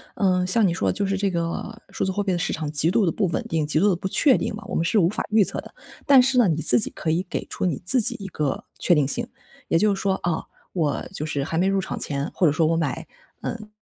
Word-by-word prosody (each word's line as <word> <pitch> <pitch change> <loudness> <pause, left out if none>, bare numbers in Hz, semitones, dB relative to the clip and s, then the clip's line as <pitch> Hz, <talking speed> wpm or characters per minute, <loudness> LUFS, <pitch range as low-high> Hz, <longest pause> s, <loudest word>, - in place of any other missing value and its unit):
呃， 185 -2 +1
像 210 +4 +2
你 175 - +2
说 - - 0
的， - - 0
就 205 - -2
是 195 0 -1
这 200 0 0
个 170 +6 -4
数 - - -3
字 190 - 0
货 205 +2 -2
币 195 - -1
的 175 - 0
市 - - -2
场 155 -2 -4
极 155 +2 +2
度 215 0 +2
地 165 - +1
不 195 - 0
稳 170 - -2
定、 160 -2 0
极 155 - +1
度 205 +4 +4
地 185 - +2
不 190 - -4
确 265 +6 +3
定 - - -3
嘛， 215 - -9
我 - - -5
们 165 - 0
是 210 - +2
无 170 -1 +3
法 - - -3
预 215 0 +4
测 - - -3
的。 - - -15 0.3
但 275 -3 +7
是 260 0 +2
呢， 235 -5 +5
你 160 -2 0
自 125 -3 +6
己 - - +2
可 160 - -4
以 175 +3 0
给 - - -3
出 - - -4
你 170 -5 -1
自 250 +8 +4
己 215 - +3
一 195 - -6
个 150 -7 -3 0.2
确 180 - +3
定 150 - +2
性， 240 +8 0 0.4
也 - - +2
就 210 +3 +3
是 195 - -5
说： 195 -1 +1
“啊， 170 -2 -1 0.3
我 155 -6 -1
就 150 - -3
是 145 -3 -2
还 160 +3 -3
没 185 - +2
入 195 0 +1
场 - - -5
前， 140 0 -3
或 180 - +1
者 145 - +2
说 160 0 +2
我 165 +1 +1
买 160 0 -2 0.4
嗯， 215 -2 -6
180 Hz, 320 characters per minute, -23 LUFS, 160-205 Hz, 0.4 s, 但